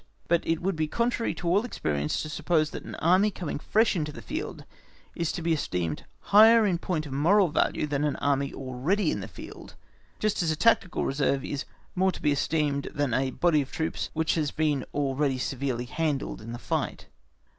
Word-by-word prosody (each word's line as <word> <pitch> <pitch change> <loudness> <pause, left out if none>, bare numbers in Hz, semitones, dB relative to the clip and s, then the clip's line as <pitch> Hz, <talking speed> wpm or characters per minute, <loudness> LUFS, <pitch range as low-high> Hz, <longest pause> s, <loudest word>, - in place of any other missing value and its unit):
But 170 -1 +3
it 165 +1 0
would 195 0 0
be 155 -1 0
contrary 235 +5 0
to 175 - -5
all 190 +5 +3
experience 75 - -2
to 155 - -6
suppose 155 0 +1
that - - -6
an - - -7
Army 185 +5 +4
coming 175 -7 -5
fresh 220 +6 +2
into 150 -3 -2
the - - -10
field - - -5 0.5
is 170 -1 -1
to 170 - -4
be 165 0 +2
esteemed 90 - -2 0.3
higher 220 +2 +8
in 180 -4 +1
point 165 -4 -2
of 140 - -7
moral 175 +7 +4
value 150 - +1
than 145 -1 -1
an 150 -2 0
Army 140 -1 0
already 140 +9 -1
in - - -2
the 95 - -6
field, - - -11 0.4
just 215 -3 0
as 170 - +1
a 155 - +1
tactical 200 -1 +2
reserve 135 -1 0
is 145 -2 -4 0.3
more 190 +1 +2
to - - -9
be 150 - +3
esteemed 145 -1 0
than 145 -4 0
a 130 +1 +1
body 155 +2 +2
of 135 - -7
troops 160 0 -2
which 160 0 +1
has 155 -3 0
been 150 -4 0
already 140 -1 0
severely 130 -1 -2
handled 145 -1 -2
in 115 +2 -8
the 120 - -5
fight. - - -3
155 Hz, 200 wpm, -27 LUFS, 140-175 Hz, 0.5 s, higher